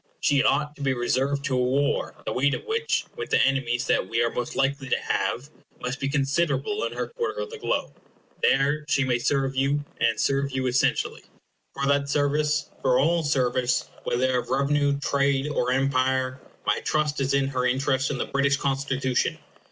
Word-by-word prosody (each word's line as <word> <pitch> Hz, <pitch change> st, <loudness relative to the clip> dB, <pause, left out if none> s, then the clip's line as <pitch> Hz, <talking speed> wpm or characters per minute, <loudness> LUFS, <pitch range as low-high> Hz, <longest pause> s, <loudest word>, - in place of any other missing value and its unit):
She 140 Hz, -2 st, +3 dB
ought 150 Hz, 0 st, +1 dB
to -, -, -11 dB
be 135 Hz, -1 st, +1 dB
reserved 135 Hz, +3 st, 0 dB
to 135 Hz, -, -1 dB
a -, -, +2 dB
war, 140 Hz, +3 st, 0 dB
the -, -, -2 dB
weight 140 Hz, +3 st, +2 dB
of -, -, -8 dB
which, 455 Hz, +1 st, 0 dB
with 455 Hz, -2 st, -5 dB
the -, -, +3 dB
enemies 125 Hz, -2 st, +1 dB
that 95 Hz, -, +1 dB
we 115 Hz, -, 0 dB
are 115 Hz, -, 0 dB
most 120 Hz, -, -4 dB
likely 135 Hz, 0 st, 0 dB
to -, -, +2 dB
have, 115 Hz, +10 st, -2 dB, 0.3 s
must 125 Hz, +2 st, -4 dB
be 135 Hz, -, -1 dB
considerable 150 Hz, -, 0 dB
in -, -, -4 dB
her -, -, -3 dB
quarter 470 Hz, -2 st, -3 dB
of 470 Hz, -2 st, -6 dB
the 460 Hz, -, -8 dB
globe. -, -, -2 dB, 0.5 s
There 145 Hz, +3 st, +2 dB
she 140 Hz, -, +3 dB
may 125 Hz, -2 st, +1 dB
serve 135 Hz, +1 st, 0 dB
you, 140 Hz, +2 st, +1 dB
and -, -, +2 dB
serve 140 Hz, 0 st, +1 dB
you 130 Hz, 0 st, -1 dB
essentially. 130 Hz, +2 st, 0 dB, 0.5 s
For 140 Hz, -, -1 dB
that 140 Hz, 0 st, +1 dB
service 150 Hz, +1 st, +1 dB
for 130 Hz, -1 st, +3 dB
all 165 Hz, +5 st, +3 dB
service, 130 Hz, -4 st, 0 dB
whether 125 Hz, +1 st, +1 dB
of -, -, -7 dB
revenue, 140 Hz, +1 st, +2 dB
trade, 140 Hz, -1 st, +1 dB
or 125 Hz, -4 st, 0 dB
empire 130 Hz, 0 st, +1 dB, 0.2 s
my -, -, +2 dB
trust 150 Hz, -2 st, 0 dB
is 135 Hz, 0 st, +1 dB
in 135 Hz, -1 st, +1 dB
her 125 Hz, -2 st, 0 dB
interest 130 Hz, +1 st, +1 dB
in -, -, -2 dB
the -, -, -1 dB
British 140 Hz, 0 st, +1 dB
Constitution. 135 Hz, -2 st, 0 dB
140 Hz, 190 wpm, -25 LUFS, 130-145 Hz, 0.5 s, She